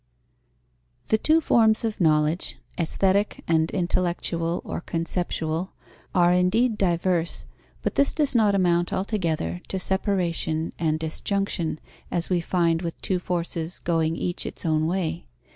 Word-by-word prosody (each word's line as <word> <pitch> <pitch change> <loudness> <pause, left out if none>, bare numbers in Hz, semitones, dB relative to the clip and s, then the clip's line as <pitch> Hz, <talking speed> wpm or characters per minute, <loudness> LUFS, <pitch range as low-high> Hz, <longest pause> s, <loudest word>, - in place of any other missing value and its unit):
_ - - -31
The 220 - +3
two 315 +6 +3
forms 225 -6 +4
of 220 -3 -2
knowledge, 155 +1 +2 0.2
aesthetic 195 +4 +1
and 160 -1 +2
intellectual 175 -2 0
or - - -4
conceptual, 165 0 -2 0.4
are 175 -1 +5
indeed 215 +7 +3
diverse, 175 -3 0 0.4
but - - 0
this 280 - +3
does 295 -4 0
not 215 -4 +4
amount 175 -2 +2
altogether 165 - -1
to 190 - -3
separation 180 -4 -1
and 155 -2 +1
disjunction, 165 0 -2 0.3
as 175 +1 -2
we 175 -1 +2
find 170 -2 +1
with 170 -2 -5
two 185 -2 +1
forces 175 -1 -3
going 165 -1 0
each 175 +1 -2
its - - -6
own 155 -1 +2
way. 165 - -2
175 Hz, 135 wpm, -25 LUFS, 165-190 Hz, 0.4 s, are